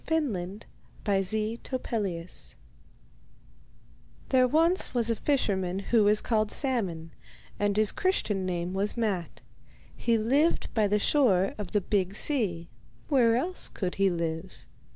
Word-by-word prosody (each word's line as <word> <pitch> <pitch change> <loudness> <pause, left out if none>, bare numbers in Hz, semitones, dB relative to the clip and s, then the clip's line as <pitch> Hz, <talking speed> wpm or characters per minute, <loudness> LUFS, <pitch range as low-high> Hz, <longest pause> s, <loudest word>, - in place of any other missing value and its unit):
The 320 - 0 1.1
Sea 215 +4 -1
King's 255 -1 -4
Gift 175 - -4 1.7
There 255 -1 +4
was 330 +7 +2
once 235 -1 +1
a - - +1
fisherman 195 -10 0
who 210 +2 +2
was 210 +1 +4
called 215 -2 0
Salmon, 190 - -2 0.5
and 205 0 0
his 215 -1 +5
Christian 220 - 0
name 175 -1 -3
was 200 +4 -1
Matte. 200 -7 -2 0.5
He 235 -1 +1
lived 275 +10 +1
by 215 -3 +2
the 205 +1 +2
shore 205 -6 +2
of 210 - -5
the 205 - +1
big 195 0 -1
sea; 200 - 0 0.4
where 240 -6 +4
else 350 +9 -1
could 185 -3 -4
he 195 - +5
live? 170 +1 -4
210 Hz, 130 wpm, -28 LUFS, 185-245 Hz, 1.7 s, his